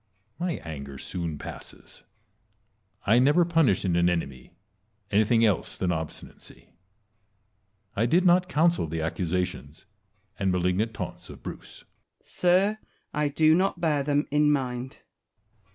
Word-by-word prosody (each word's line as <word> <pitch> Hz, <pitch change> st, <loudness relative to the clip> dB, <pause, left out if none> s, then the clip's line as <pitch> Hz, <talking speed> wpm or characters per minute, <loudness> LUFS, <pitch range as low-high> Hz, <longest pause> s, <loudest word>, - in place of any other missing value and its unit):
My 175 Hz, 0 st, -1 dB
anger 70 Hz, -4 st, -7 dB
soon 85 Hz, 0 st, -4 dB
passes. -, -, -9 dB, 1.0 s
I 115 Hz, +4 st, +5 dB
never 150 Hz, +7 st, +4 dB
punish 160 Hz, -, +2 dB
in 90 Hz, -2 st, +1 dB
an 85 Hz, 0 st, +3 dB
enemy 70 Hz, -4 st, -4 dB, 0.6 s
anything 110 Hz, +2 st, +4 dB
else 105 Hz, -3 st, 0 dB
than 90 Hz, -1 st, 0 dB
obstinacy. 80 Hz, -2 st, -7 dB, 1.3 s
I 115 Hz, +4 st, +2 dB
did 175 Hz, +8 st, +3 dB
not 180 Hz, +1 st, +4 dB
counsel 170 Hz, -, +2 dB
the 80 Hz, +1 st, -3 dB
accusations 85 Hz, -4 st, -3 dB, 0.5 s
and 95 Hz, -2 st, +1 dB
malignant 90 Hz, +5 st, 0 dB
taunts -, -, -6 dB
of -, -, -12 dB
Bruce. -, -, -9 dB, 0.3 s
Wallace. -, -, -20 dB
Sir, 190 Hz, +4 st, +2 dB, 0.4 s
I 150 Hz, 0 st, +1 dB
do 155 Hz, +2 st, +4 dB
not 185 Hz, +1 st, +1 dB
bear 155 Hz, -4 st, +1 dB
them 145 Hz, +1 st, +1 dB
in 150 Hz, 0 st, +4 dB
mind. 130 Hz, -2 st, -2 dB
Edward. -, -, -25 dB
115 Hz, 135 wpm, -26 LUFS, -, 1.3 s, I